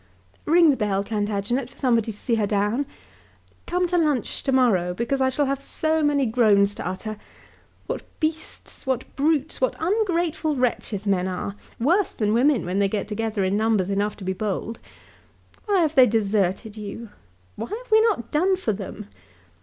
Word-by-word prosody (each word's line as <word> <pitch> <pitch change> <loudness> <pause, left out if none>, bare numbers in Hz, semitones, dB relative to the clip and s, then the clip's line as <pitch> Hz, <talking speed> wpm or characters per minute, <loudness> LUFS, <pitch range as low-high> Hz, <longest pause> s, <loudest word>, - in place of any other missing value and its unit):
"Ring 330 0 +6
the 270 - -1
bell, 200 -2 0
Plantagenet, 210 +4 -2
for - - -21
somebody 230 -4 +1
to 205 - -12
see 235 - -2
her 215 -3 +2
down. 210 +7 0 0.8
Come 360 +1 +1
to 355 0 +1
lunch 295 -8 0
to 270 - -1
morrow 195 -9 +2
because 240 +6 -1
I 260 - +3
shall 285 +3 0
have 275 0 -2
so 315 +3 -1
many 290 -2 +2
groans 210 -4 +3
to - - -6
utter. 215 +3 -5 0.7
What - - -3 0.2
beasts, 315 -3 -4
what 255 -2 -2
brutes, 300 0 0
what 255 - +1
ungrateful 345 -5 0
wretches 230 -5 -1
men 190 -2 +1
are! 190 +2 -4 0.2
worse 345 - +2
than 210 -1 +1
women 255 0 +3
when 180 +3 -1
they 200 -1 +2
get 205 0 -2
together 220 -1 -2
in 190 +1 +1
numbers 215 -3 +1
enough 205 +1 -1
to 200 - -10
be 190 0 -1
bold. 215 +3 -3 0.9
Why 400 -3 +3
have 315 -2 +1
they 260 -3 +7
deserted 205 -1 0
you? 215 +2 -7 0.5
What - - -6
have 460 +4 -7
we 440 0 +7
not 420 - 0
done 365 +6 +3
for 300 - -1
them? 200 +1 -7
235 Hz, 175 wpm, -24 LUFS, 205-300 Hz, 0.9 s, they